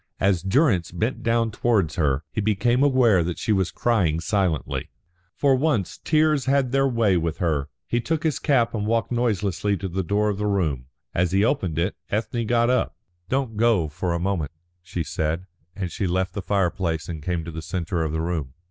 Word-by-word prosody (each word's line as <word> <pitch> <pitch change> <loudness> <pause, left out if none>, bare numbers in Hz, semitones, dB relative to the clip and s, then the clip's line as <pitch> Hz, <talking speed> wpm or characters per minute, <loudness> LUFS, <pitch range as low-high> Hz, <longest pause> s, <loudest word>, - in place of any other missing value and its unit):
As 95 -3 +2
Durrance 95 - +2
bent 110 +9 -2
down 115 -1 +1
towards 100 -8 +1
her, 75 -3 +1
he 110 - -2
became 110 +5 +2
aware 125 -10 +4
that 85 +1 -3
she - - -1
was 95 -4 +2
crying 90 -6 +1
silently. 90 -3 -1 0.5
For 140 -2 +4
once 130 - 0
tears 155 -2 +2
had 135 -2 +2
their 135 0 +3
way 115 -7 +2
with 85 -1 -1
her. 75 -6 0 0.2
He 120 - 0
took 160 +4 -1
his 160 -3 0
cap 130 -6 +2
and 105 -2 -2
walked 115 +1 0
noiselessly 105 -4 0
to 95 - -4
the 95 +1 -2
door 105 +4 +1
of 100 -1 -2
the 105 - 0
room. 80 -11 0 0.3
As 90 0 +1
he 100 +2 +4
opened 95 - 0
it, 90 +4 0
Ethne 115 +2 -1
got 120 +1 +3
up. 125 - 0 0.3
"Don't 130 -5 -1
go 110 -8 +3
for 85 +3 -2
a - - -1
moment," 90 -5 -1 0.3
she 85 -1 -4
said, 80 +4 -2 0.3
and 95 -4 -4
she 95 - -2
left 90 +1 0
the 100 - -3
fireplace 90 -5 0
and 80 -3 -5
came 85 0 -2
to 85 - -6
the 80 0 -6
centre 85 0 -2
of 80 -2 -1
the 80 +1 -1
room. 80 -6 -3
100 Hz, 200 wpm, -24 LUFS, 85-115 Hz, 0.5 s, aware